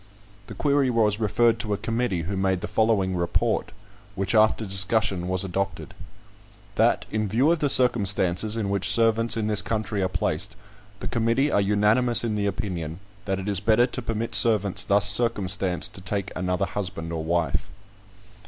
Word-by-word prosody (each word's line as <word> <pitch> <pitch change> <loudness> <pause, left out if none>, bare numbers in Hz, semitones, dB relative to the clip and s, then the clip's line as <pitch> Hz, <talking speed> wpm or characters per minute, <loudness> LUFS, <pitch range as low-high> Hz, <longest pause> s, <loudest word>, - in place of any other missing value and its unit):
The - - -9
query 140 -2 +1
was 110 -3 +1
referred 115 +2 +1
to 110 -3 -3
a - - -7
committee, 115 -7 -2
who 95 +5 -4
made 95 -1 -1
the - - -4
following 105 -4 0
report; 85 -1 -1 0.4
which, 100 +1 -2
after 110 0 +3
discussion, 95 -2 +1
was 95 0 -2
adopted: 95 -1 -4 0.8
"That, - - +1
in 110 -1 -1
view 125 - +2
of 170 - 0
the 145 - 0
circumstances 105 -4 +2
in 100 -3 -2
which 100 -1 -1
servants 115 +2 +3
in 110 - -1
this 105 -1 +2
country 105 -1 -3
are 95 - 0
placed, 95 +2 -1 0.5
the - - -4
committee 120 +4 0
are 100 - +2
unanimous 105 +5 +2
in 115 -2 -2
the 105 -1 -1
opinion, 90 -5 -5 0.3
that 95 -1 -2
it 95 +1 -6
is 100 -3 +1
better 110 +4 +3
to 125 0 -5
permit 115 0 -4
servants 105 -4 +3
thus 100 -2 +3
circumstanced 100 -5 +1
to 95 - -9
take 100 +2 -3
another 90 +1 -1
husband 90 -4 -5
or 80 -1 -4
wife." 80 -2 -1
100 Hz, 170 wpm, -24 LUFS, 95-115 Hz, 0.8 s, after